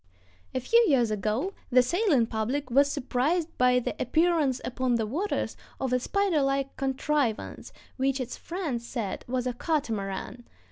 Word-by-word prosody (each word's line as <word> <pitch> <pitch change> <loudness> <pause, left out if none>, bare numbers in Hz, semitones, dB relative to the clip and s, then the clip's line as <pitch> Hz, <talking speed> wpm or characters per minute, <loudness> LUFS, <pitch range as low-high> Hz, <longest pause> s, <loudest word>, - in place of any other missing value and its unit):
] 90 +1 -33
A - - +2
few 465 - +4
years 245 -6 +3
ago 215 - -1 0.2
the 255 0 +5
sailing 340 - +2
public 240 +5 -2
was 280 +3 +4
surprised 305 +8 0
by 250 0 +5
the 250 - -1
appearance 310 -2 +2
upon 255 0 0
the 225 -2 0
waters 330 - -2 0.2
of 260 -2 -1
a 250 - +3
spider 390 +2 +1
like 275 0 0
contrivance 270 -3 -1 0.3
which 270 +1 +1
its 255 -1 -4
friends 320 -10 -4
said 225 -5 -4
was 250 0 -1
a 250 - -1
"catamaran." 235 - -3
260 Hz, 155 wpm, -28 LUFS, 240-300 Hz, 0.3 s, the